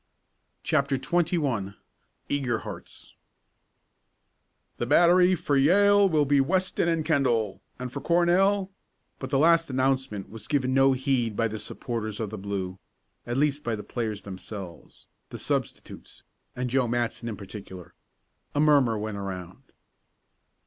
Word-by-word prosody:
CHAPTER 140 -1 +1
XXI 145 - -1 0.5
EAGER 130 -5 0
HEARTS 105 -6 -10 1.6
"The - - -2
battery 180 +1 +5
for 145 -3 -1
Yale 200 +7 +5
will 155 -3 +2
be 140 0 +3
Weston 185 +4 0
and 165 -2 0
Kendall, 115 - +1 0.2
and 125 0 -6
for 140 - -5
Cornell 185 +3 +2 0.2
" - - -47
But - - -5
the 135 - +1
last 165 +2 +4
announcement 130 -6 -1
was 110 0 -9
given 130 -3 0
no 135 0 +5
heed 130 -4 0
by 115 - +1
the 110 0 -6
supporters 110 -3 -4
of 110 -3 -3
the 110 - -6
blue 95 -2 -4 0.5
at 120 +1 -2
least 145 0 +1
by 115 - -1
the 105 - -7
players 110 -4 -4
themselves, 95 -2 -9 0.2
the - - -7
substitutes, - - -4 0.3
and 125 0 -2
Joe 130 -1 +2
Matson 120 0 -2
in 105 - -6
particular. 95 -2 -10 0.6
A - - +1
murmur 140 -7 +4
went 105 0 -4
around. 95 +1 -7
130 Hz, 140 wpm, -26 LUFS, 105-150 Hz, 1.6 s, battery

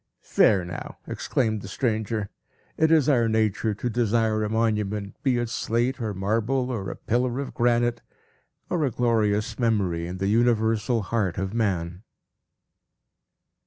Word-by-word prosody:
"There 95 -5 +5
now!" 85 - -7
exclaimed 110 -4 -1
the 95 - -8
stranger; 110 -1 -2 0.4
"it 160 - +3
is 155 -5 +4
our 120 -6 +3
nature 110 -1 +1
to 125 - -3
desire 110 -2 +1
a 105 - -1
monument, 105 -2 -1
be 130 -3 +2
it 120 0 -1
slate, 120 +2 -1
or 110 -3 -2
marble, 115 +7 0
or 100 -6 -3
a - - -5
pillar 125 +2 -1
of 140 - -5
granite, 120 0 +1 0.7
or 175 -3 0
a 140 - +2
glorious 110 -3 0
memory 95 -8 0
in 90 +1 -5
the 95 - -2
universal 115 +1 +2
heart 100 -4 -1
of 95 +1 -2
man." 90 -6 -1
110 Hz, 145 wpm, -25 LUFS, 105-120 Hz, 0.7 s, There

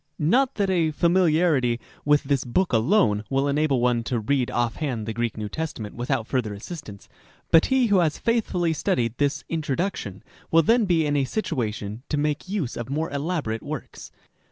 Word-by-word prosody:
Not 250 - +2
that 200 -2 +1
a 170 -4 +2
familiarity 160 -7 +2 0.3
with 145 0 +4
this 140 -2 0
book 155 +7 0
alone 115 - +3
will 135 +1 +1
enable 140 -2 +1
one 120 -1 +2
to 120 -1 -1
read 125 +3 0
offhand 120 0 -2
the 110 - -3
Greek 120 -1 -2
New 105 -1 -3
Testament 110 -4 -5
without 120 -2 -2
further 115 -5 -2
assistance; 110 - -9 0.4
but 165 - +6
he 265 -2 +3
who 205 -4 +3
has 160 -4 +1
faith 230 -1 0
fully 175 -3 0
studied 120 -6 -1
this 145 0 0
" - - -48
Introduction 155 - -3
" - - -27
will 165 0 +5
then 230 +6 +3
be 170 -4 +2
in 145 0 0
a 140 -2 +2
situation 115 - -3
to 150 - 0
make 150 +4 -1
use 190 - -2
of 120 0 -5
more 155 +4 -2
elaborate 140 -7 -2
works. - - -7
145 Hz, 185 wpm, -24 LUFS, 120-170 Hz, 0.4 s, but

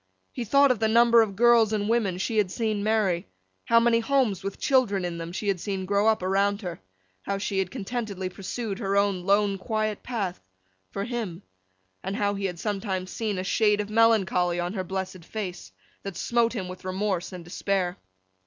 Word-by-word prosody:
He 240 - -4
thought 280 +4 +5
of 245 - 0
the 220 - +2
number 235 +1 +6
of 205 -3 -1
girls 235 0 +5
and 210 -1 0
women 215 -6 +1
she 220 +4 -2
had 200 -3 +2
seen 215 0 -1
marry, 210 -5 +1 0.4
how 230 - +5
many 230 0 +3
homes 235 -6 +1
with 195 0 -4
children 215 -9 +2
in 170 -1 -4
them 165 0 -5
she 205 +3 -4
had 195 -3 +1
seen 190 0 -3
grow 200 +2 +2
up 220 -4 +2
around 200 +2 +1
her, 175 -3 -5 0.4
how 200 - -2
she 195 0 -2
had 190 -2 0
contentedly 210 -4 -4
pursued 195 +3 -5
her 200 -3 0
own 200 -2 +2
lone 200 0 +2
quiet 215 +1 -2
path—for 95 - -6
him—and 165 - -7
how 205 0 +1
he 200 0 -3
had 180 -2 -3
sometimes 190 -1 -3
seen 215 -4 -2
a 185 - -2
shade 210 +1 +2
of 210 0 -3
melancholy 195 -6 +3
on 175 +2 -2
her 190 -3 -2
blessed 185 -1 -5
face, 180 - -6 0.3
that 195 -4 -6
smote 235 -1 +1
him 195 -6 -4
with 185 0 -9
remorse 185 -1 -2
and 180 -2 -8
despair. 180 +1 -1
200 Hz, 190 wpm, -26 LUFS, 185-220 Hz, 0.4 s, number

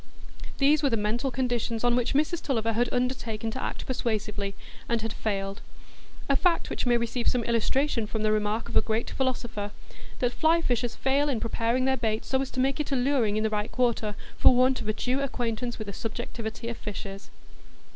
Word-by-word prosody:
These 290 +2 +4
were 285 - +3
the 230 - +1
mental 220 +5 0
conditions 240 -3 -1
on 240 0 +4
which 245 +1 0
Mrs 310 +4 +2
Tulliver 230 -4 0
had 240 +2 +1
undertaken 240 -3 -1
to 260 +3 -4
act - - -4
persuasively, 210 -5 -2 0.3
and 230 -2 +1
had 225 -1 -2
failed; 195 -2 -2 0.7
a 275 - +3
fact 340 +2 +2
which - - -2
may 240 -1 +5
receive 235 +1 -2
some 245 -2 +2
illustration 235 +1 +1
from 220 0 -3
the 215 - +3
remark 215 +2 0
of 235 - -7
a - - +7
great 220 +1 -1
philosopher, 240 -6 -2 0.5
that 245 -1 0
fly 325 +2 +4
fishers 245 -6 0
fail 280 +2 +2
in 250 -5 0
preparing 230 +3 0
their 265 0 +2
bait 220 -2 -1
so 265 0 +1
as 270 - -3
to 255 - -5
make 270 +3 +2
it 295 - -2
alluring 250 -5 +2
in 215 - +1
the 220 - +1
right 210 0 -1
quarter, 235 -4 +1 0.2
for 255 - +7
want 255 0 +3
of 220 - -6
a 215 - +2
due 250 +4 0
acquaintance 240 -3 -2
with 215 - -5
the 200 - -6
subjectivity 225 +1 -5
of 235 - -4
fishes. 195 -1 -7
235 Hz, 200 wpm, -27 LUFS, 220-260 Hz, 0.7 s, a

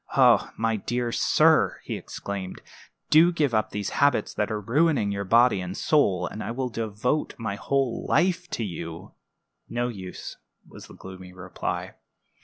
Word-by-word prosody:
Oh, - - +5
my 115 0 0
dear 120 +3 -2
sir," - - +3
he - - -4
exclaimed, 100 -2 -6 0.5
"do 165 +3 +7
give 150 -7 0
up 110 -1 +1
these 100 0 -4
habits 140 -6 +2
that 105 -1 -1
are 105 - -1
ruining 125 -1 +1
body 115 -2 +4
and 90 +2 -5
soul, 105 - +2
and 110 - -6
I - - -5
will 125 +2 -2
devote 115 +5 -2
my 110 -3 -3
whole 135 +3 -1
life 175 +2 +2
to 120 - -3
you!" 85 -4 -6 0.6
"No 120 +1 -1
use," 95 -5 -8 0.3
was - - -12
the - - -14
gloomy 95 -1 -11
reply. 90 0 -5
115 Hz, 155 wpm, -25 LUFS, 100-135 Hz, 0.6 s, do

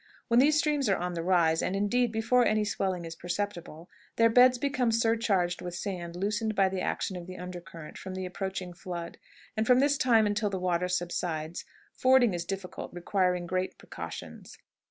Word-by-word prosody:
When 235 +1 +5
these 295 +3 +5
streams 295 -5 +1
are 195 - +3
on 180 0 -3
the 170 - -3
rise, 165 -2 +3
and, 190 - -1
indeed, 235 +4 +1
before 225 +3 +3
any 215 -2 +2
swelling 190 -4 -2
is 165 0 -7
perceptible, 175 -3 -5 0.3
their 230 0 +4
beds 250 +1 +6
become 260 -2 0
surcharged 225 -6 +1
with 175 -1 -5
the - - -4
sand 175 -3 -5
loosened 210 +3 -1
by 195 -1 +4
the 190 -1 -3
action 190 - -2
of 175 -1 -7
the 185 - -8
under 180 0 -7
current 165 -4 -11
from 190 0 -7
the 185 0 -4
approaching 185 -1 -4
flood, 170 -1 -7 0.4
and 220 0 0
from 250 - +6
this 285 +1 +2
time 230 -4 +4
until 210 0 0
the 195 - -3
water 180 -1 0
subsides 175 -2 -3 0.3
fording 255 -4 +4
is 175 -1 -3
difficult, 190 0 -6
requiring 180 0 0
great 185 +1 -2
precautions. - - -9
190 Hz, 190 wpm, -29 LUFS, 175-225 Hz, 0.4 s, beds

